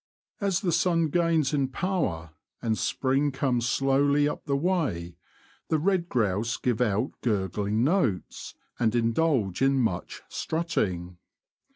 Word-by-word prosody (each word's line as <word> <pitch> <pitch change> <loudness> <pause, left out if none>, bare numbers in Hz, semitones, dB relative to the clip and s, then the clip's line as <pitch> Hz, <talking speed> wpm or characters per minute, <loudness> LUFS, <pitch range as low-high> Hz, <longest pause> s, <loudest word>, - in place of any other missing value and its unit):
As 195 -3 0
the 185 -4 0
sun 165 -2 +2
gains 165 -2 +2
in 140 -2 +1
power, 130 - -2 0.3
and 110 -1 0
spring 135 +5 0
comes 125 -3 0
slowly 140 +2 +3
up - - -5
the 140 -2 0
way, 140 - -1 0.5
the 160 - +3
red 175 +1 0
grouse 110 0 0
give 125 -2 -1
out 110 +2 +1
gurgling 105 0 0
notes, 135 - -1 0.2
and 115 -1 +2
indulge 115 - +1
in 135 0 +3
much 100 -8 -2
strutting. 95 - -2
135 Hz, 130 wpm, -27 LUFS, 105-160 Hz, 0.5 s, slowly